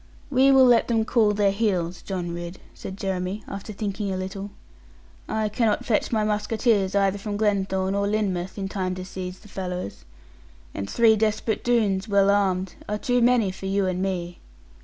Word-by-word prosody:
'We 265 Hz, +1 st, +5 dB
will 265 Hz, -1 st, +7 dB
let 240 Hz, -2 st, +5 dB
them 225 Hz, -2 st, +1 dB
cool 220 Hz, -2 st, +3 dB
their 200 Hz, -1 st, +3 dB
heels, 185 Hz, -5 st, -1 dB
John 180 Hz, -3 st, -4 dB
Ridd,' 175 Hz, +1 st, -6 dB
said 190 Hz, -, -8 dB
Jeremy, 190 Hz, +1 st, -3 dB
after 200 Hz, +2 st, -7 dB
thinking 205 Hz, -1 st, -3 dB
a 190 Hz, -, -2 dB
little. 190 Hz, +2 st, -5 dB, 0.8 s
'I 220 Hz, -1 st, 0 dB
cannot 215 Hz, 0 st, 0 dB
fetch 215 Hz, -, +1 dB
my 220 Hz, -2 st, +1 dB
musketeers 210 Hz, -1 st, +1 dB
either 200 Hz, 0 st, +2 dB
from 205 Hz, 0 st, -4 dB
Glenthorne 195 Hz, -2 st, 0 dB
or 200 Hz, 0 st, 0 dB
Lynmouth, 195 Hz, -3 st, -1 dB
in 195 Hz, -1 st, -3 dB
time 185 Hz, -2 st, -2 dB
to 185 Hz, 0 st, -6 dB
seize 185 Hz, -1 st, -6 dB
the 210 Hz, -, -17 dB
fellows. 180 Hz, -, -5 dB, 0.7 s
And 100 Hz, 0 st, -5 dB
three 225 Hz, -2 st, +5 dB
desperate 220 Hz, 0 st, 0 dB
Doones, 215 Hz, -5 st, +1 dB
well 200 Hz, -1 st, +4 dB
armed, 190 Hz, -2 st, +1 dB, 0.2 s
are 210 Hz, -, 0 dB
too 245 Hz, +1 st, +1 dB
many 235 Hz, -5 st, +3 dB
for 190 Hz, +1 st, -7 dB
you 195 Hz, 0 st, +1 dB
and 185 Hz, 0 st, -1 dB
me. 180 Hz, -2 st, -3 dB
200 Hz, 180 wpm, -24 LUFS, 190-215 Hz, 0.8 s, will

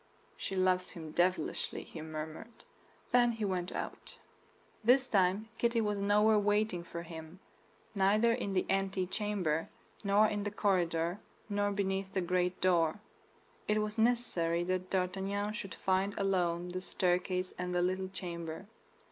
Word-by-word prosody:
"She 195 Hz, -, -4 dB
loves 185 Hz, -1 st, +2 dB
him 160 Hz, -3 st, -8 dB
devilishly," 180 Hz, +3 st, 0 dB
he 160 Hz, -, -9 dB
murmured. 155 Hz, +8 st, -7 dB, 0.5 s
Then 240 Hz, -1 st, +5 dB
he 220 Hz, -2 st, -2 dB
went 180 Hz, -2 st, -1 dB
out. -, -, -6 dB, 0.7 s
This 255 Hz, +3 st, +5 dB
time 200 Hz, 0 st, +2 dB
Kitty 235 Hz, 0 st, +2 dB
was 210 Hz, -2 st, 0 dB
nowhere 210 Hz, +2 st, +4 dB
waiting 205 Hz, -3 st, +1 dB
for 170 Hz, 0 st, -6 dB
him; 160 Hz, +1 st, -9 dB, 0.5 s
neither 210 Hz, +4 st, +4 dB
in 200 Hz, -5 st, -2 dB
the 185 Hz, -, +1 dB
antechamber, 190 Hz, -3 st, 0 dB, 0.3 s
nor 205 Hz, +1 st, +5 dB
in 210 Hz, -1 st, 0 dB
the 205 Hz, -, -2 dB
corridor, 175 Hz, -3 st, +1 dB, 0.3 s
nor 205 Hz, 0 st, +1 dB
beneath 195 Hz, -1 st, -1 dB
the 190 Hz, -, +1 dB
great 180 Hz, 0 st, 0 dB
door. 175 Hz, 0 st, +2 dB, 0.7 s
It 210 Hz, 0 st, +2 dB
was 210 Hz, +1 st, -4 dB
necessary 200 Hz, -8 st, +2 dB
that 185 Hz, +1 st, -2 dB
D'Artagnan 195 Hz, +2 st, -1 dB
should 195 Hz, -4 st, -6 dB
find 190 Hz, +1 st, 0 dB
alone 180 Hz, -3 st, 0 dB
the 185 Hz, +1 st, -4 dB
staircase 185 Hz, 0 st, 0 dB
and 180 Hz, 0 st, -2 dB
the 175 Hz, -, +3 dB
little 185 Hz, +1 st, -1 dB
chamber. 170 Hz, -2 st, -6 dB
190 Hz, 140 wpm, -33 LUFS, 180-205 Hz, 0.7 s, Then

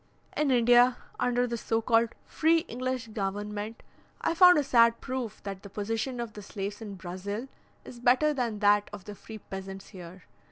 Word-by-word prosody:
In 300 Hz, -1 st, +1 dB
India, 245 Hz, 0 st, +5 dB, 0.2 s
under 245 Hz, 0 st, +1 dB
the 235 Hz, -1 st, -3 dB
so 225 Hz, 0 st, 0 dB
called 230 Hz, 0 st, +2 dB
"free 325 Hz, +1 st, +2 dB
English 255 Hz, -5 st, -4 dB
government," 210 Hz, +1 st, -4 dB, 0.4 s
I -, -, 0 dB
found 360 Hz, 0 st, +7 dB
a 295 Hz, -, +3 dB
sad 235 Hz, -3 st, +4 dB
proof 255 Hz, -4 st, -5 dB
that 195 Hz, -1 st, -6 dB
the 200 Hz, -, -11 dB
position 225 Hz, +5 st, -3 dB
of 235 Hz, -2 st, -5 dB
the 210 Hz, -, -9 dB
slaves 200 Hz, +1 st, -6 dB
in 205 Hz, -3 st, -7 dB
Brazil 190 Hz, +6 st, -5 dB, 0.4 s
is 240 Hz, -, -10 dB
better 255 Hz, +5 st, +3 dB
than 240 Hz, -6 st, -2 dB
that 205 Hz, 0 st, +4 dB
of 190 Hz, -, -9 dB
the 210 Hz, -, -7 dB
free 220 Hz, +2 st, -10 dB
peasants 195 Hz, -1 st, -8 dB
here. 180 Hz, -2 st, -11 dB
225 Hz, 175 wpm, -28 LUFS, 205-250 Hz, 0.4 s, found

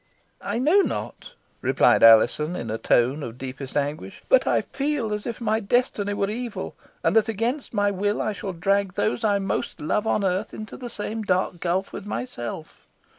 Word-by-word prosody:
"I -, -, -2 dB
know 315 Hz, +11 st, +4 dB
not," -, -, -4 dB, 0.3 s
replied -, -, +4 dB
Alizon, 120 Hz, +9 st, +6 dB
in 115 Hz, -8 st, -4 dB
a 110 Hz, -, -3 dB
tone 130 Hz, +5 st, +2 dB
of 120 Hz, -3 st, -6 dB
deepest 130 Hz, +1 st, -6 dB
anguish, 150 Hz, +7 st, -3 dB
"but -, -, +5 dB
I -, -, +3 dB
feel 275 Hz, -6 st, -2 dB
as 210 Hz, 0 st, -4 dB
if 235 Hz, -, -4 dB
my 220 Hz, -2 st, +1 dB
destiny 205 Hz, -2 st, 0 dB
were 200 Hz, -, 0 dB
evil; 240 Hz, 0 st, -5 dB, 0.3 s
and -, -, +2 dB
that, 225 Hz, 0 st, +4 dB
against 235 Hz, +6 st, -2 dB
my 205 Hz, -2 st, +1 dB
will, 205 Hz, +2 st, -1 dB
I 215 Hz, -, -1 dB
shall 200 Hz, -1 st, -5 dB
drag 195 Hz, +2 st, 0 dB
those 225 Hz, +2 st, 0 dB
I 205 Hz, -2 st, +3 dB
most 195 Hz, -1 st, -3 dB
love 210 Hz, +8 st, -1 dB
on 210 Hz, -, +1 dB
earth 190 Hz, +2 st, -1 dB
into 215 Hz, 0 st, -8 dB
the 245 Hz, -2 st, -7 dB
same 220 Hz, 0 st, -4 dB
dark 185 Hz, -3 st, 0 dB
gulf 185 Hz, +3 st, -1 dB
with 205 Hz, -, -7 dB
myself. 155 Hz, -, -6 dB
205 Hz, 185 wpm, -24 LUFS, 170-225 Hz, 0.3 s, Alizon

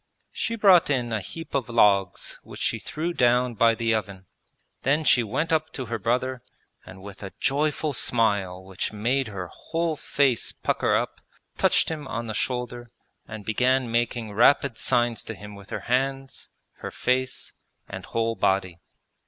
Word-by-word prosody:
She 230 Hz, -, -2 dB
brought 195 Hz, -7 st, +6 dB
in 125 Hz, -5 st, 0 dB
a 110 Hz, -, -1 dB
heap 165 Hz, -, -9 dB
of 135 Hz, -4 st, -1 dB
logs 100 Hz, -5 st, +2 dB
which -, -, -11 dB
she -, -, 0 dB
threw 170 Hz, +3 st, -3 dB
down 125 Hz, -2 st, +3 dB
by 115 Hz, +1 st, +4 dB
the 115 Hz, 0 st, +1 dB
oven. 100 Hz, -3 st, -3 dB, 0.6 s
Then 145 Hz, +4 st, +2 dB
she 130 Hz, -4 st, +5 dB
went 150 Hz, +9 st, -1 dB
up 160 Hz, 0 st, +1 dB
to 130 Hz, -, -4 dB
her 115 Hz, -1 st, -3 dB
brother, 125 Hz, +4 st, -1 dB, 0.4 s
and 95 Hz, 0 st, -12 dB
with 100 Hz, 0 st, -10 dB
a 95 Hz, -2 st, -7 dB
joyful 150 Hz, +1 st, 0 dB
smile 100 Hz, -7 st, +1 dB
which 95 Hz, 0 st, -4 dB
made 120 Hz, +5 st, 0 dB
her 95 Hz, -4 st, -6 dB
whole 165 Hz, -1 st, -2 dB
face 140 Hz, -4 st, +1 dB
pucker -, -, 0 dB
up, -, -, -2 dB, 0.3 s
touched -, -, +3 dB
him 155 Hz, -4 st, -5 dB
on 120 Hz, -3 st, -4 dB
the 110 Hz, -, -4 dB
shoulder 120 Hz, 0 st, -3 dB, 0.4 s
and 110 Hz, -2 st, -8 dB
began 125 Hz, +3 st, +1 dB
making 115 Hz, -2 st, -1 dB
rapid 120 Hz, +3 st, +4 dB
signs 120 Hz, -1 st, +1 dB
to 115 Hz, -, -6 dB
him 105 Hz, +2 st, -10 dB
with 100 Hz, 0 st, -13 dB
her -, -, -4 dB
hands, 135 Hz, +2 st, -2 dB, 0.3 s
her -, -, -6 dB
face, 130 Hz, +1 st, -1 dB, 0.3 s
and -, -, -7 dB
whole 115 Hz, 0 st, -1 dB
body. 95 Hz, -4 st, 0 dB
120 Hz, 165 wpm, -25 LUFS, 105-135 Hz, 0.6 s, brought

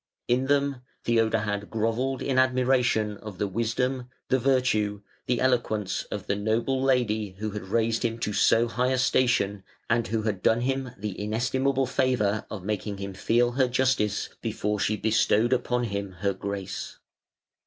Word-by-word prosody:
In 130 Hz, +2 st, +1 dB
them 140 Hz, -2 st, +1 dB, 0.2 s
Theodahad 110 Hz, -3 st, +1 dB
grovelled 115 Hz, +4 st, -1 dB
in 130 Hz, -2 st, +1 dB
admiration 125 Hz, -5 st, +2 dB
of 105 Hz, -3 st, -9 dB
the 105 Hz, -, 0 dB
wisdom, 120 Hz, +5 st, -1 dB, 0.2 s
the 130 Hz, -, +3 dB
virtue, 115 Hz, -6 st, +1 dB, 0.2 s
the 125 Hz, -1 st, +1 dB
eloquence 115 Hz, -6 st, 0 dB
of -, -, -5 dB
the 100 Hz, -, 0 dB
noble 115 Hz, +6 st, 0 dB
lady 110 Hz, -7 st, +1 dB
who 110 Hz, +1 st, -3 dB
had 105 Hz, -2 st, -6 dB
raised 115 Hz, +2 st, +1 dB
him 115 Hz, -1 st, 0 dB
to 105 Hz, -, -1 dB
so 115 Hz, +3 st, +4 dB
high 125 Hz, +2 st, 0 dB
a 130 Hz, -, +1 dB
station 120 Hz, -6 st, +2 dB, 0.3 s
and 115 Hz, 0 st, +2 dB
who 110 Hz, +1 st, -1 dB
had 105 Hz, -4 st, -2 dB
done 115 Hz, +5 st, +3 dB
him 135 Hz, 0 st, -1 dB
the 100 Hz, -1 st, -5 dB
inestimable 130 Hz, +5 st, +1 dB
favour 125 Hz, -5 st, 0 dB
of 100 Hz, -4 st, -6 dB
making 105 Hz, -1 st, -3 dB
him 100 Hz, 0 st, -5 dB
feel 120 Hz, +5 st, +2 dB
her 130 Hz, +1 st, +2 dB
justice 125 Hz, -4 st, +1 dB
before 105 Hz, 0 st, -2 dB
she 105 Hz, +2 st, +1 dB
bestowed 110 Hz, +2 st, +2 dB
upon 125 Hz, -1 st, 0 dB
him 100 Hz, -3 st, -3 dB
her 100 Hz, +3 st, -1 dB
grace. 100 Hz, 0 st, -5 dB
115 Hz, 160 wpm, -26 LUFS, 105-125 Hz, 0.3 s, so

